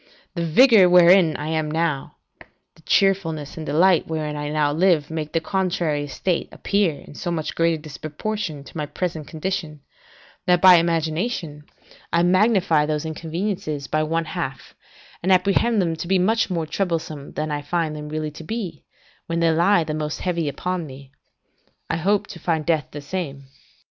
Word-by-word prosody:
The 170 -2 -2
vigour 210 - +6
wherein 175 -2 +6
I 150 +2 -4
now 155 -2 -2 0.2
am, - - -15 0.3
the - - -22
cheerfulness 165 -7 +1
and 160 -1 -7
delight 170 +4 +3
wherein 155 -2 -3
I 145 0 -4
now 150 -1 +1
live, 165 -3 +2
make 155 -1 -4
the 165 - +1
contrary 170 -5 -1
estate 170 +5 -2
appear 200 -6 0
in - - -13
so 175 - -5 0.2
great 165 0 +2
a - - -5
disproportion 155 +2 -5
to - - -15
my 150 -2 -3
present 160 -3 -4
condition, 160 -3 -4 0.7
that, 180 -1 +4
by 185 -1 +8
imagination, 165 -1 -1 0.5
I 170 0 +3
magnify 185 -4 +3
those 150 0 -2
inconveniences 160 -2 -3
by 155 - 0
one 165 +2 -1
half, 155 -5 -5 0.5
and 185 - +1
apprehend 200 +5 +3
them 170 -3 0
to 170 - -5
be 190 +1 +3
much 220 +5 +2
more 170 -3 -1
troublesome, 160 -4 -3
than 155 0 -3
I 145 0 -2
find 160 +1 -2
them 150 0 -7
really 155 0 -3
to 155 +2 -10
be, 205 +1 -5 0.4
when 170 0 -1
they 165 -1 +3
lie 170 +2 +3
the 155 -1 -4
most 150 0 -3
heavy 170 -4 -1
upon 180 +2 -3
me; 135 0 -12 0.8
I - - 0
hope 200 +5 +1
to - - -9
find 160 -3 -1
death 160 -5 +1
the 145 - -8
same. 145 -3 -5
165 Hz, 170 wpm, -22 LUFS, 150-180 Hz, 0.8 s, by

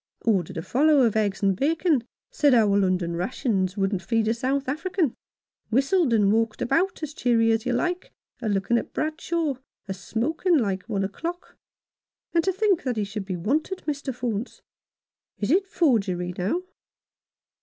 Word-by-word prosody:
" - - -54
Ordered 190 -5 +1
a 165 - -3
follow 295 - +4
of 225 -3 +2
eggs 205 -2 0
and 195 -1 +3
bacon 300 - +1
— - - -69
said 290 - +4
our 210 -4 +4
London 185 -3 +1
rations 190 0 -1
wouldn't 195 -1 0
feed 225 +1 0
a 225 - +3
South 265 +3 -1
African, 320 - -1 0.6
whistled 275 - +2
and 210 -3 +4
walked 225 -1 0
about 350 +5 0
as 300 -1 -4
cheery 230 -4 +2
as 225 +2 0
you 250 - +1
like, 355 +8 -1 0.3
a 225 - -1
lookin' 205 +4 +1
at - - -9
Bradshaw, 310 -2 -1 0.3
a 190 - -2
smokin' 310 - 0
like 195 -7 0
one 195 -1 0
o'clock. 335 - -5 0.8
And 335 -1 +3
to 380 - +2
think 390 -1 +2
that 250 -4 -2
he 210 - +1
should 205 0 -5
be 185 -2 -3
wanted, 300 - -1
Mr. 285 -3 -2
Faunce! 240 -2 -4 0.8
Is 210 +4 -1
it 385 +3 +3
forgery, 195 - +1
now 210 - -1
235 Hz, 170 wpm, -25 LUFS, 200-310 Hz, 0.8 s, follow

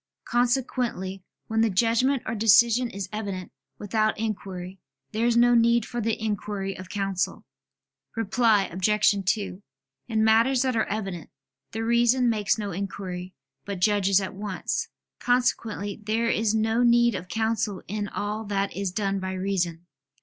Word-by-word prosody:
Consequently 240 -6 -1 0.2
when 225 0 0
the 225 - +3
judgment 230 +6 +2
or 220 - -2
decision 235 +2 +4
is 195 -2 -5
evident 200 -4 -4 0.3
without 215 +1 0
inquiry, 190 -4 -5 0.3
there 225 +2 0
is 235 -1 +2
no 240 +1 +5
need 235 0 +4
for 240 -1 -4
the 225 0 -1
inquiry 205 -2 -3
of 185 0 -10
counsel. 195 -2 -2 0.7
Reply 225 -1 +3
Obj. 205 +4 +2 0.2
2: 200 -3 -5 0.5
In 220 -2 +1
matters 230 +4 +4
that 260 -2 0
are 220 - +2
evident, 195 -6 -4 0.4
the 225 +1 -3
reason 235 +1 +3
makes 210 -1 +1
no 205 -2 -4
inquiry, 185 -1 -5 0.3
but 200 -2 -5
judges 195 0 +3
at 190 - -4
once. 200 -1 -3 0.3
Consequently 225 -5 0
there 225 +2 0
is 220 0 +1
no 220 +2 +1
need 240 -1 +4
of 185 -2 -5
counsel 220 -1 -1
in 205 +1 -3
all 210 +2 -3
that 200 -1 -2
is 195 -1 -2
done 195 0 -1
by 190 0 -4
reason. 180 -3 -2
210 Hz, 150 wpm, -26 LUFS, 195-230 Hz, 0.7 s, no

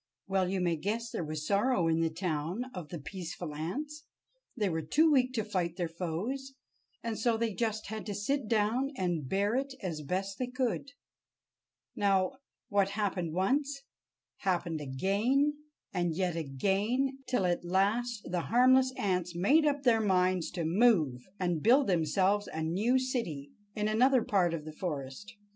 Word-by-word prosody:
Well, 190 -1 +1
you 190 -1 -1
may 170 -2 +1
guess 220 +7 -2
there - - -3
was 155 0 -4
sorrow 200 -2 +2
in 165 0 +2
the 165 - +2
town 170 +5 -2
of 175 -5 -7
the 175 - -5
peaceful 165 +1 -6
ants. 290 - -5 0.5
They 210 -3 +1
were 160 -3 -1
too 310 - +3
weak 255 -3 +3
to 225 -4 0
fight 180 -5 -2
their 175 -2 -1
foes, 190 +12 -4 0.5
and 230 -2 -3
so 230 0 +2
they 225 -1 -1
just 220 0 -2
had 220 0 -5
to 205 - -3
sit 245 +5 -1
down 225 +5 +1
and 175 -7 -1
bear 200 +2 +1
it 270 +1 -1
as 165 -5 -3
best 190 +6 -3
they 255 - -1
could. 255 +2 -2 1.0
Now, 195 +4 +2 0.3
what 200 -4 +2
happened 190 -6 -1
once, 275 - 0 0.5
happened 175 -4 -1
again, 210 - +1 0.4
and 175 -3 0
yet 180 -1 0
again, 200 - 0
till 245 -7 +1
at 175 -1 0
last 205 +6 +1
the 180 -1 0
harmless 255 +2 +5
ants 180 -6 -1
made 290 - +4
up 285 -1 0
their 230 -3 +4
minds 185 -3 +2
to 170 -4 -2
move 165 - +3 0.2
and 175 -4 0
build 260 +6 +5
themselves 190 +4 +1
a 160 - -3
new 205 +11 +2
city 230 - -3 0.2
in 210 0 0
another 250 +3 +4
part 180 -4 +2
of 155 -2 -7
the 155 - -7
forest. 155 +5 -5
195 Hz, 165 wpm, -31 LUFS, 170-240 Hz, 1.0 s, harmless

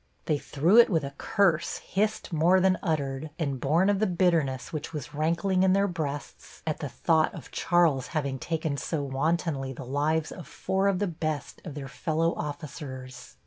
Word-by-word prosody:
They 150 -2 +1
threw 165 +13 +4
it 235 - +7
with 165 -7 +1
a 140 0 -5
curse 180 -6 +2
hissed 210 -1 -2
more 170 +4 +4
than 185 0 +3
uttered 145 -3 -2
and 140 -5 -2
born 160 +9 +3
of 205 -1 +2
the 215 - +2
bitterness 170 -6 +1
which 155 +2 -4
was 150 0 -6
rankling 170 +5 +1
in 190 0 +4
their 200 +1 +3
breasts 150 -5 -6
at 155 -2 -2
the 145 - -4
thought 160 +5 +2
of - - -10
Charles 165 -7 +2
having 140 -5 -2
taken 160 -2 -2
so 150 +1 -2
wantonly 140 0 -1
the 125 - -8
lives 150 +4 0
of 175 - -9
four 190 +1 0
of 195 -2 +2
the 205 - 0
best 155 -4 -4
of 155 -6 -7
their 140 -2 -5
fellow 160 +4 0
officers. 130 - -7
155 Hz, 185 wpm, -28 LUFS, 140-175 Hz, -, it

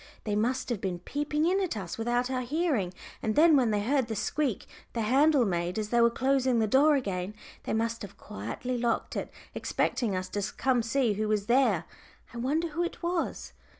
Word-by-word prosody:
"They 210 -2 -1
must 250 +5 0
have 230 -5 -2
been 185 -4 -2
peeping 295 - -1
in 375 +3 +2
at 360 - -2
us 185 -4 -5
without 240 +2 0
our 255 -1 0
hearing, 260 - 0 0.3
and 215 - -1
then 315 +1 +6
when 255 -5 +4
they 205 -1 0
heard 265 +1 +1
the 220 - -3
squeak 270 0 -1 0.3
the 230 - -1
handle 270 +4 +4
made 175 -1 -1
as 215 -1 -2
they 240 +1 +3
were 235 - +6
closing 260 0 +1
the 220 - +3
door 285 +7 +5
again, 195 -6 -2 0.3
they - - -2
must 230 +1 -1
have 205 - -9
quietly 240 - -5
locked 235 -1 -1
it, - - -3 0.2
expecting 220 -6 -1
us 185 0 -2
to 205 - -2 0.2
come 260 -2 +2
to 230 - -6
see 250 -4 +2
who 215 +2 -1
was 210 -1 0
there. 235 -7 +3 0.5
I - - -7
wonder 300 +8 0
who 330 +3 -1
it 345 - -5
was!" 345 0 -2
240 Hz, 210 wpm, -29 LUFS, 210-275 Hz, 0.5 s, then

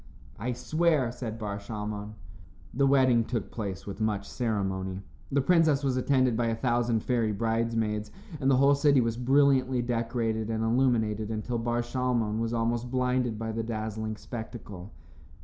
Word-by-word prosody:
"I 125 +4 -2
swear," 155 -1 +1
said 120 -2 -5
Bar 105 -2 -4
Shalmon. 105 0 -5 0.6
The 135 +2 +3
wedding 130 -4 +4
took 115 -3 -4
place 100 -4 -5
with 100 +2 -6
much 105 -2 -1
ceremony. 95 -5 -2 0.3
The 140 0 +3
princess 160 -3 +3
was 135 -2 +1
attended 130 -2 +2
by 115 0 +1
a 115 - 0
thousand 120 -2 +1
fairy 115 -4 +1
bridesmaids, 115 0 -1 0.3
and 135 - +1
the 135 - +5
whole 140 +2 +5
city 140 -1 +4
was 115 -2 +1
brilliantly 130 0 +3
decorated 115 -2 -1
and 110 0 -1
illuminated 115 -3 +1
until 115 +2 -2
Bar 120 +1 0
Shalmon 120 -3 -1
was 115 0 -1
almost 120 +1 -1
blinded 125 -2 0
by 110 0 -3
the 115 +1 -2
dazzling 110 -1 -3
spectacle. 110 -4 -8
115 Hz, 155 wpm, -28 LUFS, 110-125 Hz, 0.6 s, the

